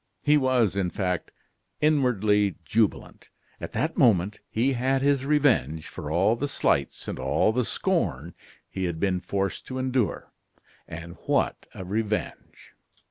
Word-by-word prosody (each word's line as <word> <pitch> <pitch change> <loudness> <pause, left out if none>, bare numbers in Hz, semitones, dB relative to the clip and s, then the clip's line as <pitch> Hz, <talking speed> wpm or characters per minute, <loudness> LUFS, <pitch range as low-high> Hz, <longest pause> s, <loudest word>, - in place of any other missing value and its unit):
He 150 0 +4
was, 130 -8 +2
in 95 -2 0
fact, 90 -2 -2 0.5
inwardly 110 - +2
jubilant. 110 -1 -1 0.3
At - - -7
that 160 +2 -1
moment 105 -6 +3
he 125 +5 +1
had 130 +2 0
his 140 -1 +2
revenge 120 - +2
for 75 - -7
all 90 +8 +3
the 145 +5 -2
slights - - 0
and - - -4
all - - +2
the 125 +3 0
scorn - - -1 0.3
he 95 -1 -3
had 85 -2 -3
been 95 -1 +1
forced 95 +1 -3
to 130 - -5
endure. 130 -5 -1 0.5
And 85 +2 -8
what - - 0
a 95 - -7
revenge! 105 +2 -4
110 Hz, 140 wpm, -26 LUFS, 95-130 Hz, 0.5 s, He